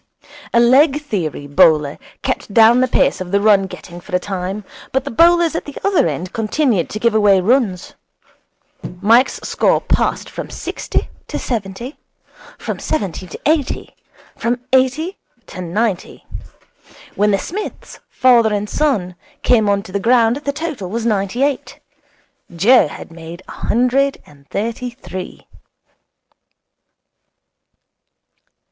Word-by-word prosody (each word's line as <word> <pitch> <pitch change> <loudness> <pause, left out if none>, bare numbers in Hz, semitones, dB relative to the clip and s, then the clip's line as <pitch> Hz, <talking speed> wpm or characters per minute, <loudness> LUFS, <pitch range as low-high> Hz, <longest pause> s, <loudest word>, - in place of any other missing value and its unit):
A 235 - +4
leg 270 +5 +5
theory 180 - -4
bowler 145 0 +3 0.2
kept - - -2
down 230 +3 +6
the 255 - +3
pace 235 - +1
of 180 - -5
the 200 +2 +2
run 200 -2 +4
getting 175 -1 -10
for 180 +1 -5
a - - +3
time, 190 +2 -4 0.3
but 265 0 0
the 280 - -5
bowlers 340 +5 +4
at 330 - -3
the 290 - -9
other 395 - +3
end 165 +4 -4
continued 225 - 0
to - - -5
give 235 0 +2
away 205 -3 +4
runs. 200 -3 +1 1.1
Mike's 230 +7 +3
score - - +2
passed - - 0
from - - -7
sixty - - -3 0.2
to - - -4
seventy, 235 +3 -5 0.6
from - - -5
seventy 190 - -3
to - - -9
eighty, 305 -3 0 0.4
from 240 +1 -1
eighty 270 +9 +1 0.3
to 185 - -8
ninety. 190 +3 -2 0.9
When 210 +1 +2
the 200 - +3
Smiths, 395 - -7
father 240 -4 +4
and 205 0 -1
son, 210 -11 0 0.3
came 220 -4 +3
on 200 0 +1
to 185 - -12
the 200 - -1
ground 235 +2 +3
the 285 -1 -3
total 285 - -5
was 230 +3 -3
ninety 210 +3 0
eight. 280 -2 -2 0.8
Joe 220 +4 +5
had 150 - -10
made 165 +2 -10
a - - -10
hundred 255 +4 +1
and 140 -1 -20
thirty 230 +4 -3
three. 185 -7 -9
220 Hz, 140 wpm, -18 LUFS, 185-260 Hz, 1.1 s, down